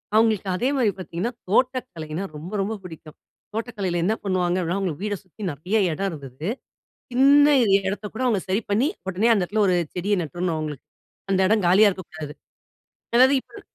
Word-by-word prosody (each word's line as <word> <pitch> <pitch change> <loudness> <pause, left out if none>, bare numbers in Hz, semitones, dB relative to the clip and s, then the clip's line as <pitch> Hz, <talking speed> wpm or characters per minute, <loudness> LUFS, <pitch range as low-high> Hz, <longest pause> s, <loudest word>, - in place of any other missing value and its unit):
அவங்களுக்கு 215 -3 +3
அதே 250 +8 0
மாரி 225 -5 +3
பார்த்தீங்கன்னா, 185 +7 -3 0.2
தோட்டக்கலைனா 195 - -1
ரொம்ப 170 +6 -8
ரொம்ப 210 +3 -2
பிடிக்கும். 160 -3 -11 0.4
தோட்டக்கலையில 205 -7 -2
என்ன 220 +3 +2
பண்ணுவாங்க 185 -2 0
அப்படினா, 175 +3 -1
அவங்களுக்கு 185 -1 -3
வீட 205 -1 -1
சுத்தி 185 +3 -17
நிறைய 180 +10 -1 0.2
இடம் 195 +4 -2
இருந்தது. 140 - -6 0.6
சின்ன 280 +3 +6 0.4
இடத்த 200 +1 -4
கூட 255 - -3
அவங்க 215 -6 +2
சரி 200 +4 +1
பண்ணி 235 +9 +3 0.2
உடனே 205 +6 +2
அந்த 195 - +1
இடத்தில 210 +3 0
ஒரு 180 - +3 0.2
செடிய 200 +3 +1
நட்டுறணும் 170 +2 -2
அவங்களுக்கு. 150 -3 -6 0.4
அந்த 190 0 +2
இடம் 215 -3 +2
காலியாக 200 +3 +6
இருக்கக்கூடாது. 160 -5 -8 0.8
அதாது 260 +3 +6
இப்ப - - -14
195 Hz, 160 wpm, -24 LUFS, 170-220 Hz, 0.8 s, சின்ன